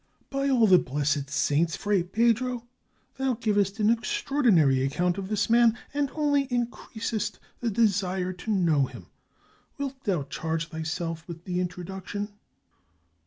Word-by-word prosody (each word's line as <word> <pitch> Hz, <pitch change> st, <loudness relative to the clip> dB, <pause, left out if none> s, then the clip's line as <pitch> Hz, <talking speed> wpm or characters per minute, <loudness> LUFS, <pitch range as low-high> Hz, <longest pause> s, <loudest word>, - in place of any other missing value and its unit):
"By 275 Hz, 0 st, 0 dB
all 245 Hz, -4 st, +5 dB
the 185 Hz, -4 st, +7 dB
blessed 140 Hz, +1 st, -1 dB
saints! 150 Hz, +2 st, +1 dB
Fray 205 Hz, -3 st, +1 dB
Pedro, 235 Hz, +5 st, +1 dB, 0.5 s
thou 265 Hz, -2 st, +1 dB
givest 205 Hz, -2 st, 0 dB
an 215 Hz, +1 st, +4 dB
extraordinary 235 Hz, -, +2 dB
account 175 Hz, +7 st, 0 dB
of 190 Hz, -, -4 dB
this 205 Hz, -2 st, +1 dB
m^an, 235 Hz, -1 st, +5 dB, 0.2 s
and 285 Hz, -1 st, 0 dB
only 290 Hz, -2 st, +2 dB
in 245 Hz, -2 st, 0 dB
creasest 220 Hz, -1 st, -4 dB, 0.2 s
the 240 Hz, -, -1 dB
desire 190 Hz, -4 st, +1 dB
to 180 Hz, +5 st, -9 dB
know 165 Hz, -9 st, +3 dB
him. -, -, -11 dB, 0.7 s
Wilt 275 Hz, -1 st, -5 dB
thou 180 Hz, -8 st, +1 dB
charge 160 Hz, +4 st, -3 dB
thy 160 Hz, -1 st, -5 dB
self 165 Hz, +1 st, -4 dB
with 170 Hz, -1 st, -8 dB
the 180 Hz, -1 st, -2 dB
introduction?" 190 Hz, +3 st, -4 dB
200 Hz, 145 wpm, -27 LUFS, 170-235 Hz, 0.7 s, the